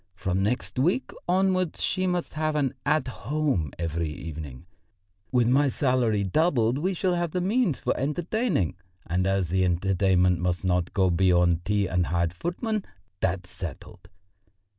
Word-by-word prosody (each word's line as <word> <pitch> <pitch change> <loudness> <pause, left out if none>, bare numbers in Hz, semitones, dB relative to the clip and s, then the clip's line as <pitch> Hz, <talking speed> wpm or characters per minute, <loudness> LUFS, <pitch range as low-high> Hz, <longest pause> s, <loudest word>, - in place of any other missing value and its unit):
From 95 -1 -1
next 125 +5 -1
week 180 - +1 0.2
onwards 185 -1 +1
she 185 0 0
must 180 -1 -2
have 155 0 -1
an 140 -4 +1
'At 150 -3 +2
Home' 135 - -1
every 85 -1 -2
evening. 75 -2 -7 0.7
With 125 -2 +3
my 135 +3 +4
salary 125 -6 +1
doubled, 125 - +2
we 185 +4 0
shall 180 +1 +1
have 175 -2 -1
the 180 - 0
means 195 - +1
for - - 0
entertaining, 150 - -1 0.3
and 90 +3 0
as 95 -3 +1
the 95 +1 +2
entertainment 90 0 +2
must 90 0 -1
not 90 -1 +1
go 95 -2 +3
beyond 90 -1 +3
tea 105 0 +1
and 90 -1 0
hired 85 -1 0
footmen 200 - -2 0.4
that's 95 0 -1
settled. 85 -7 -8
105 Hz, 150 wpm, -26 LUFS, -, 0.7 s, my